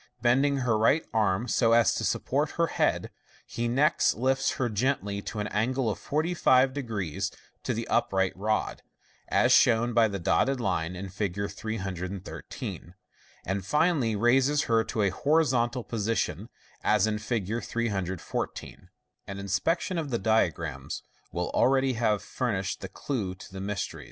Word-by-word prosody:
Bending 135 +4 +3
her 115 -3 +1
right 140 +8 +3
arm 110 0 +1
so 115 -2 +3
as 115 0 +5
to - - -2
support - - 0
her - - +4
head, - - 0 0.3
he 120 0 -3
next 140 +7 +3
lifts 135 +2 +1
her 125 - -1
gently 105 -3 -1
to 110 - -6
an 105 - -1
angle 120 +3 0
of - - -6
450 145 -4 +2 0.8
to - - -2
the - - -3
upright 95 -1 +1
rod 110 +3 -1 0.5
(as - - +3
shown 120 +1 +4
by 115 -1 +5
the 100 -2 -3
dotted 125 +9 +1
line 90 -5 -1
in 95 +1 -6
Fig. 100 +1 -2
313), 95 -3 -6 0.5
and 95 0 -2
finally 150 - +2
raises 135 +7 +3
her 115 -1 +2
to 110 - -1
a 100 - +3
horizontal 125 - +1
position, 115 0 -2 0.3
as 105 -1 +3
in 105 -1 -1
Fig. 110 +1 -2
314. 95 -6 -4 0.4
An 100 - -6
inspection 160 - 0
of 155 -3 -4
the 120 - 0
diagrams 85 - -1 0.3
will 90 0 -2
already 135 0 +3
have 110 -3 +1
furnished 100 -7 -2
the - - -6
clue 105 -10 -3
to 95 - -13
the 95 - -6
mystery. 100 -1 -3
110 Hz, 145 wpm, -28 LUFS, 100-130 Hz, 0.8 s, as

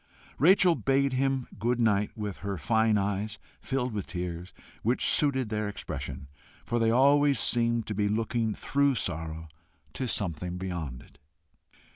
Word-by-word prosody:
Rachel 180 +3 +6
bade 135 -3 +1
him 135 -1 0
good 120 +3 0
night 105 -2 +1
with 105 -3 -4
her 100 0 -4
fine 110 +6 +2
eyes 100 +1 -2 0.2
filled 130 -3 -2
with 100 -3 -4
tears, 90 -1 -5 0.3
which 120 +4 +1
suited 130 -5 +3
their 105 -1 -2
expression, 85 -7 -6 0.4
for 120 - -1
they 115 -1 +3
always 140 +2 +4
seemed 115 -1 +2
to 105 - -4
be 105 0 0
looking 110 0 -1
through 140 -1 +1
sorrow 80 -4 -4 0.5
to 130 - -3
something 90 -4 -2
beyond 85 -9 -5
it. 70 - -22
110 Hz, 145 wpm, -28 LUFS, 95-130 Hz, 0.5 s, Rachel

